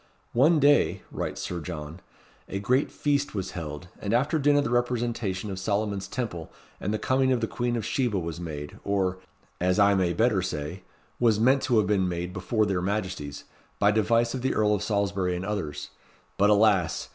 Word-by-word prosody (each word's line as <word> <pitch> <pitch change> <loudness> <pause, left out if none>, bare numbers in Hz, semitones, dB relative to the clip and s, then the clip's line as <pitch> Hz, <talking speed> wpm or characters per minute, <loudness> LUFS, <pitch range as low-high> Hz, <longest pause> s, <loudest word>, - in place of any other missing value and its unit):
"One 150 +7 +5
day," 145 0 +3
writes - - -4
Sir 90 - -4
John, 80 -1 -7 0.5
"a - - -3
great 125 +8 +1
feast 145 -3 0
was 95 -2 -3
held; 80 0 -6
and 105 +3 0
after 150 +6 +1
dinner 145 0 +4
the 140 - -2
representation 120 -5 -1
of 95 - -5
Solomon's 100 0 -1
Temple 100 -11 -4 0.3
and 100 - -2
the 110 - 0
coming 130 +3 +2
of 125 - +2
the 115 - 0
Queen 120 +1 -2
of 115 - -2
Sheba 120 -7 0
was 85 -2 -4
made, 75 -4 -7
or 95 -2 0 0.4
(as 90 +2 +1
I 100 -1 +5
may 90 -3 +1
better 110 -2 +2
say) 85 0 -4 0.4
was 115 -3 +3
meant 130 +4 +4
to 125 -3 +2
have 105 - +4
been 95 -2 +1
made 90 +1 -4
before 105 +4 0
their 95 -3 0
Majesties, 90 -7 -3 0.3
by 100 0 +4
device 115 +2 +2
of 130 - -3
the 130 +1 0
Earl 105 -1 +3
of 105 - 0
Salisbury 100 -3 0
and 90 +2 -4
others. 75 -8 -4 0.5
But 100 +1 +3
alas! 100 -5 +3
100 Hz, 190 wpm, -27 LUFS, 90-120 Hz, 0.5 s, One